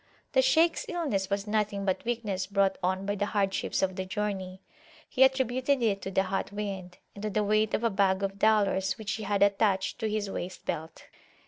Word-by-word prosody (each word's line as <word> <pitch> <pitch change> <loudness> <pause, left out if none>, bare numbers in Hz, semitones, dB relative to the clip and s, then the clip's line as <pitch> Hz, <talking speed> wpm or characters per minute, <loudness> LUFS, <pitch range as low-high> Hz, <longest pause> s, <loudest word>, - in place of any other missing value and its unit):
The - - +4
Shaykhs 335 -9 +3
illness 275 - -1
was 200 0 -1
nothing 210 -2 -1
but 190 -2 0
weakness 220 -6 -2
brought 200 -1 +1
on 185 +1 0
by 205 - 0
the 205 0 -1
hardships 195 -2 0
of 190 -1 0
the 190 - -1
journey: 190 -2 -3 0.4
he 260 - -3
attributed 260 0 +2
it 200 -3 +1
to - - -4
the 190 0 +2
hot 195 +1 -2
wind, 195 -3 -5 0.2
and 200 - -10
to 215 - -2
the 210 +1 0
weight 215 +1 +2
of 225 - -3
a 230 - +2
bag 195 -1 +2
of 195 0 -3
dollars 200 -3 +2
which 215 -2 -4
he 220 - -3
had 200 0 +2
attached 200 -1 +1
to 220 -2 -1
his 210 -1 -1
waist 185 -1 -6
belt. 160 0 -5
200 Hz, 205 wpm, -29 LUFS, 195-220 Hz, 0.4 s, The